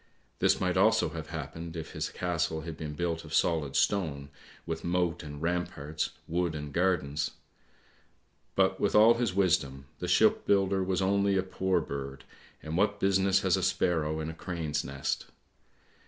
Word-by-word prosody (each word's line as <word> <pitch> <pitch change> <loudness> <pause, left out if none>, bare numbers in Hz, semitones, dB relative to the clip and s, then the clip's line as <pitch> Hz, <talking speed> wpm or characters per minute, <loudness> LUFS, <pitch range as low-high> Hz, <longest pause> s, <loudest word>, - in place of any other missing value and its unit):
This - - +3
might - - 0
also - - +4
have - - -7
happened 85 0 -6
if 80 -1 -6
his - - -3
castle 85 -3 -1
had 80 0 -6
been 75 -1 -6
built 85 +1 -2
of - - -5
solid 80 -5 +1
stone, 75 -9 0 0.4
with 80 -1 -4
moat 90 -1 0
and 75 -1 -8
ramparts, 80 -3 -2 0.2
wood 85 -1 -1
and 75 -2 -6
gardens. 80 -5 +1 1.3
But - - +2
with - - +1
all 110 +2 +8
his 115 -5 -1
wisdom, 70 -8 +1
the - - -3
shipbuilder 95 -1 +3
was 95 0 0
only 100 0 +2
a 95 - +2
poor 95 0 0
bird, 70 -1 -6 0.4
and 80 +1 -4
what 100 +2 +1
business 95 0 +3
has 95 -2 +3
a 95 - -1
sparrow 85 -4 +1
in 80 - -3
a 80 - -4
crane's 80 -3 -3
nest? 70 0 -3
85 Hz, 160 wpm, -29 LUFS, 75-95 Hz, 1.3 s, all